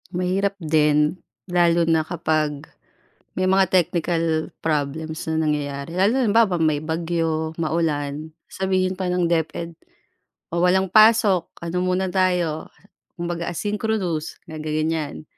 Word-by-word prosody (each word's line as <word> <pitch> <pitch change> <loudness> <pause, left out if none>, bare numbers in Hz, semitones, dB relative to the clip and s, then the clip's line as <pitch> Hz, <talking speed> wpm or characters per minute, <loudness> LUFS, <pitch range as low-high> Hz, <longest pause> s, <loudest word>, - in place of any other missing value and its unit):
Mahirap 185 +2 -1
din, 150 -1 +2 0.2
lalo 175 -2 +3
na 165 -1 +3
kapag, 155 -3 -1 0.7
may 185 0 +1
mga 190 0 +3
technical 165 -2 +1
problems 155 +1 -2
na 160 - 0
nangyayari 145 0 -3
lalo 190 +3 +3
na - - +2
halimbawa 210 -4 +3
may 155 -2 +1
bagyo, 160 -1 -1
maulan, 155 -2 -2 0.2
sabihin 185 -1 -1
pa 190 - -2
ng 180 -1 +1
DepED 170 0 -1 0.8
o 170 - 0
walang 190 +1 +3
pasok 215 -4 +5 0.2
ano 175 +2 -2
muna 185 +1 0
tayo, 180 -4 0 0.5
kumbaga 170 0 -3
asynchronous, 205 -3 -2
na 160 -1 -8
gaganyan. 155 0 -2
170 Hz, 120 wpm, -22 LUFS, 155-185 Hz, 0.8 s, pasok